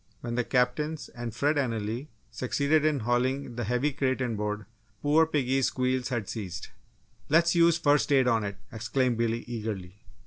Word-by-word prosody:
When 120 - -4
the 125 +1 +1
captains 135 +6 0
and 120 -2 -6
Fred 145 +7 +1
Anally 115 0 -2 0.2
succeeded 140 +6 +1
in 150 -4 +2
hauling 125 +2 0
the 120 -1 -2
heavy 125 +6 +1
crate 130 -1 0
inboard, 105 -4 -2 0.4
poor 155 +2 +4
piggy's 135 -4 +1
squeals 130 -1 0
had 120 -6 -2
ceased. 95 -6 -6 0.6
"Let's 170 +2 +4
use 170 -1 +5
'first 145 -2 +2
aid' 135 -2 +4
on 115 -3 +2
it!" 100 -1 -4
exclaimed 120 +1 0
Billy, 115 0 0
eagerly. 105 -5 -5
125 Hz, 160 wpm, -28 LUFS, 115-145 Hz, 0.6 s, use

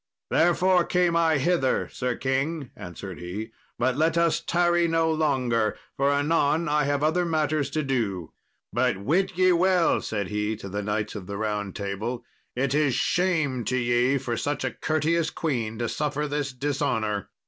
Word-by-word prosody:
"Therefore 175 +2 +4
came 175 -1 +1
I 165 -2 +3
hither, 140 -2 +1
Sir 125 -1 -2
king," 135 +2 -2
answered 90 +1 -8
he; 100 +6 -6 0.3
"but 125 +1 +1
let 160 +3 +2
us 170 -1 +3
tarry 175 0 +2
no 165 0 +2
longer, 130 -8 +1 0.2
for 140 +1 +2
anon 150 +2 +2
I 150 -1 +2
have 145 0 0
other 160 +4 +2
matters 155 -3 0
to 155 - -1
do. 110 - -2 0.4
But 120 -2 +1
wit 170 - 0
ye 185 0 +5
well," 180 0 +3
said 100 -4 -3
he 105 +1 -1
to 100 -2 -8
the 100 +2 -3
Knights 105 +1 -2
of 100 -4 -7
the 100 0 -5
Round 105 -2 -2
Table, 105 +5 -4 0.3
"it 135 +2 0
is 145 -4 +2
shame 155 -5 +1
to 130 - 0
ye 120 +2 +2
for 125 -3 -3
such 145 +4 -2
a - - -1
courteous 160 +1 0
queen 120 -10 -2
to 120 0 -1
suffer 150 +3 -2
this 145 -1 -2
dishonour." 125 -7 -1
140 Hz, 170 wpm, -26 LUFS, 115-160 Hz, 0.4 s, ye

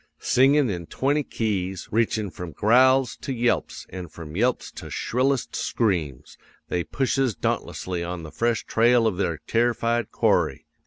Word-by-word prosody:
Singin' 135 +2 +4
in 85 -3 -5
twenty 145 +3 0
keys, 95 -8 -3
reachin' 110 -2 0
from 85 -2 -8
growls 130 - +4
to - - -6
yelps 120 -1 -1
an' 90 -1 -6
from 80 -1 -10
yelps 120 +5 0
to - - -9
shrillest 130 +2 -1
screams, 85 - -2 0.3
they 90 - 0
pushes 135 -2 0
dauntlessly 90 +2 -2
on 85 -1 -5
the 80 - -9
fresh 115 -1 0
trail 120 +1 +3
of 105 -5 0
their 85 -5 -1
terrified 115 -1 +1
quarry. - - +1
115 Hz, 145 wpm, -24 LUFS, 90-125 Hz, 0.3 s, Singin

